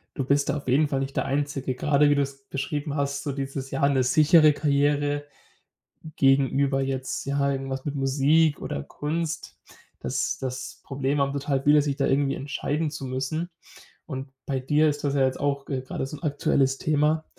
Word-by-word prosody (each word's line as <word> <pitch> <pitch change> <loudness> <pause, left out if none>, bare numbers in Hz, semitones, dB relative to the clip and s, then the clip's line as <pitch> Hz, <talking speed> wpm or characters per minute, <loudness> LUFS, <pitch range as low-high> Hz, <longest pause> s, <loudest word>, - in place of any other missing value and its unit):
Du 135 - -1
bist 140 +2 +1
da 145 - +1
auf 140 - -9
jeden 145 +4 +3
Fall 135 -1 -1
nicht 135 0 -4
der - - 0
Einzige, 135 -1 -2
grade 145 +2 +3
wie 145 - +4
du 145 - +2
es 135 0 -5
beschrieben 145 +1 -3
hast, 140 -1 -1
so 145 - -2
dieses 135 0 -4
ja, 140 +1 +2
'ne 135 -2 +2
sichere 155 +3 +5
Karriere 145 0 +1 0.9
gegenüber 135 0 +3
jetzt, 130 -1 -3
ja, 140 0 +1
irgendwas 135 -1 -3
mit 145 - -3
Musik 145 +3 +2
oder 70 - -4
Kunst. 160 - -4 0.4
Das - - -2
das 130 -1 -5
Problem 140 +1 -1
haben 140 0 +1
total 140 -1 -1
viele, 150 +1 +5
sich 140 -1 -1
da 140 - +1
irgendwie 140 0 +2
entscheiden 145 +2 -2
zu 135 - -7
müssen. 140 +7 -3 0.6
Und 135 -2 -6 0.2
bei 135 -2 -1
dir 150 +4 +2
ist 145 0 -1
das 145 -1 0
ja 140 - +2
jetzt 130 - -2
auch, 140 -1 -1
äh, 130 -2 -2
gerade 130 - -4
so 145 +3 -7
'n - - -18
aktuelles 140 -2 +1
Thema. 155 +2 +1
140 Hz, 190 wpm, -25 LUFS, 135-145 Hz, 0.9 s, sichere